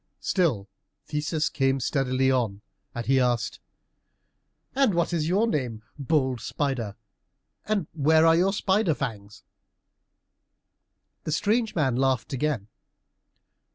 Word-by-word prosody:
Still 140 - +1 0.4
Theseus 150 +1 -1
came 135 0 +1
steadily 130 0 +1
on, 115 -6 0 0.3
and 120 -1 -4
he 135 +1 +3
asked, 120 -2 0 1.1
"And 270 -8 +2
what 170 0 0
is 160 -2 0
your 195 +6 +2
name, 125 - -2 0.2
bold 130 -4 0
spider, 125 -8 -2 0.7
and 210 -5 0
where 160 +1 +4
are 165 0 +6
your 185 +3 +3
spider's 195 - +1
fangs?" 105 -3 -6 1.8
The 155 - -3
strange 215 +7 +1
man 135 -7 +1
laughed 130 0 0
again. 135 -6 -1
140 Hz, 115 wpm, -26 LUFS, 125-165 Hz, 1.8 s, are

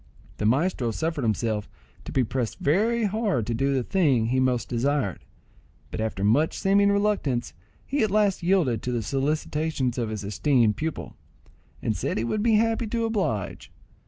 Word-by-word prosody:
The 105 - 0
maestro 135 0 +1
suffered 160 +5 -2
himself 110 -1 -1 0.4
to - - -6
be 130 - +2
pressed 120 0 -3
very 220 +10 +1
hard 205 - 0
to 120 - -2
do 135 +4 +1
the 130 -2 +1
thing 135 - +2
he 130 +1 +1
most 125 -2 +1
desired, 125 - -1 0.7
but - - -3
after 110 -3 -2
much 135 +10 +2
seeming 200 +1 +3
reluctance 200 -12 0 0.3
he 280 0 -1
at 215 - +2
last 205 -3 +2
yielded 170 - +2
to 125 - -3
the 120 -2 -1
solicitations 140 0 -1
of 115 -2 -1
his 110 -1 -4
esteemed 105 +2 +2
pupil, 160 0 -5 0.7
and - - 0
said - - -2
he 110 - 0
would 205 - -1
be 225 0 +3
happy 225 +1 +1
to 230 +1 -1
oblige 190 - -2
him. - - -30
140 Hz, 175 wpm, -25 LUFS, -, 0.7 s, seeming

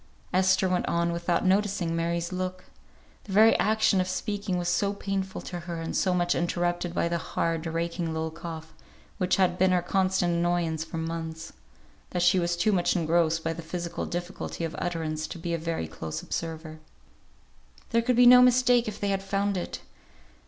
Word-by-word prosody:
Esther 185 +1 +3
went 180 -1 0
on, 170 0 +1
without 170 +1 0
noticing 190 -3 +1
Mary's 170 +1 -1
look. 185 0 -4 0.6
The 195 - -7
very 220 +3 +6
action 215 -2 +3
of 185 - -2
speaking 200 -1 -2
was 175 -1 -2
so 200 +3 +1
painful 195 -1 -3
to 175 - -6
her, 170 0 -6
and 165 - -4
so 185 -2 +2
much 175 0 +2
interrupted 175 0 -1
by - - +1
the 170 0 -1
hard, 165 0 -2
raking 170 +1 -2
little 160 0 -2
cough, 160 -1 -8 0.5
which 185 -1 +2
had 180 -2 +1
been 190 +1 +4
her 180 -1 +2
constant 185 -1 +1
annoyance 170 -2 0
for 165 0 -7
months, 160 0 -5 0.6
that 180 -1 -1
she 180 +1 +4
was 175 0 0
too 215 +5 +2
much 180 -2 +1
engrossed 165 -1 +1
by 165 - -1
the 170 - -7
physical 170 +1 -4
difficulty 175 -1 -5
of 165 0 -3
utterance, 160 -3 -2
to - - -7
be 170 0 -4
a - - +1
very 165 - -2
close 80 0 -6
observer. 160 -1 -5 1.1
"There 230 0 +3
could 250 +1 +1
be 245 +1 +6
no 250 +1 +9
mistake 250 -1 +4
if 210 - -5
they 205 - -1
had 195 -1 0
found 195 +1 -1
it. 180 - -4
175 Hz, 185 wpm, -27 LUFS, 165-190 Hz, 1.1 s, no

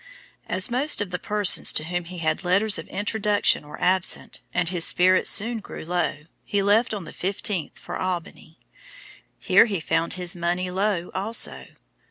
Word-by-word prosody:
As 185 +5 -2
most 270 +5 0
of 205 -3 -3
the 180 - -3
persons 210 0 +4
to - - -1
whom 175 +1 -3
he 180 +1 -9
had 155 +1 -1
letters 200 +3 +2
of - - -8
introduction 205 -5 0
were 150 - -10
absent, 185 0 0
and 165 - 0
as - - -1
his 175 -3 0
spirits 185 +2 +4
soon 230 +3 +1
grew 200 - -9
low, 170 -3 -2 0.2
he 200 -1 -1
left 210 +4 +3
on 200 - -6
the - - -10
fifteenth 190 -2 -2
for - - -7
Albany. 175 -3 -5 0.8
Here 195 +3 +5
he 200 -5 -2
found 165 +1 0
his 180 +1 -3
money 175 +1 -2
low 190 -2 -1
also. 205 +5 -2
185 Hz, 175 wpm, -24 LUFS, 175-205 Hz, 0.8 s, Here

